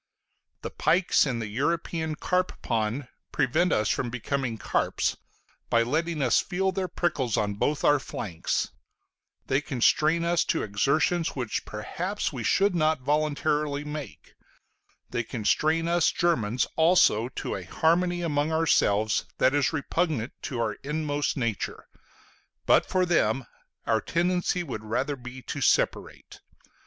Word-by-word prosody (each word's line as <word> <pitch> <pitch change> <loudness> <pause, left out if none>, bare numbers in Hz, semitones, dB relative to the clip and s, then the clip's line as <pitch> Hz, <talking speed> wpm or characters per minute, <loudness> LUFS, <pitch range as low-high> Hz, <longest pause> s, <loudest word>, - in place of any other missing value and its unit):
The - - -4
pikes 175 -3 +2
in 125 -3 -1
the 115 - -3
European 160 +6 -1
carp 180 +3 -1
pond 115 +4 -1 0.2
prevent 165 +7 +1
us 105 -1 +2
from 120 - 0
becoming 125 0 -2
carps, - - 0 0.5
by 115 0 +4
letting 155 +4 -1
us 125 - +4
feel 190 +1 -1
their 190 -1 -2
prickles 150 -9 -1
on 105 -1 0
both 145 +8 -1
our 145 0 +5
flanks; 95 -10 -3 0.7
they 135 +2 +1
constrain 155 +5 +2
us 170 0 +2
to 165 - 0
exertions 140 - +1
which 125 -5 -3
perhaps 175 - -4
we 125 -4 -4
should 200 - +3
not 155 -4 +1
voluntarily 150 0 0
make; 150 -6 -8 0.8
they 120 - 0
constrain 155 +9 +1
us 170 -1 +3
Germans 125 -9 +1
also 160 -9 +4
to - - -4
a 95 - -5
harmony 175 - +1
among 150 -1 0
ourselves 110 -10 +2
that 130 - +3
is 145 -1 +2
repugnant 145 -4 -1
to 125 - -4
our 110 -2 -1
inmost 145 0 -2
nature: 115 -5 -3 0.8
but - - +4
for 185 -1 +1
them, 135 -8 +1 0.4
our 110 -1 +2
tendency 180 +1 0
would 125 -9 -6
rather 125 +7 -1
be 130 0 -10
to - - -5
separate. - - 0
145 Hz, 135 wpm, -27 LUFS, 120-165 Hz, 0.8 s, our